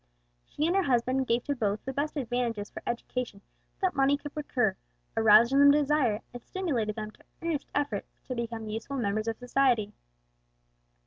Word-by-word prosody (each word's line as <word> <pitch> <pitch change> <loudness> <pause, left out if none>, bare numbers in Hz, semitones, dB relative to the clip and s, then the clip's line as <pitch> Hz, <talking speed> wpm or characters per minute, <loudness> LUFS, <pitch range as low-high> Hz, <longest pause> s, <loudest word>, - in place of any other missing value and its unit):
She 300 - -2
and 345 +3 +2
her 390 - +4
husband 260 -3 +1
gave 235 +1 +1
to 285 - -1
both 210 -4 -1
the 265 - -3
best 295 +3 -2
advantages 235 -5 -2
for - - -8
education 240 -2 -3 0.4
that 375 -1 +2
money 275 +1 +3
could 290 0 -8
procure, 245 -9 0 0.4
aroused 225 +3 +6
in 275 - +5
them 285 0 +8
the 285 - +6
desire, 270 -7 +1
and 245 - -7
stimulated 255 - -2
them 215 -1 -5
to - - -23 0.2
earnest 320 -4 -2
efforts 290 0 -1
to 255 - -5
become 230 -2 -4
useful 225 +6 -4
members 215 -2 -1
of 225 -1 -1
society. 245 -4 +1
245 Hz, 180 wpm, -29 LUFS, 225-285 Hz, 0.4 s, them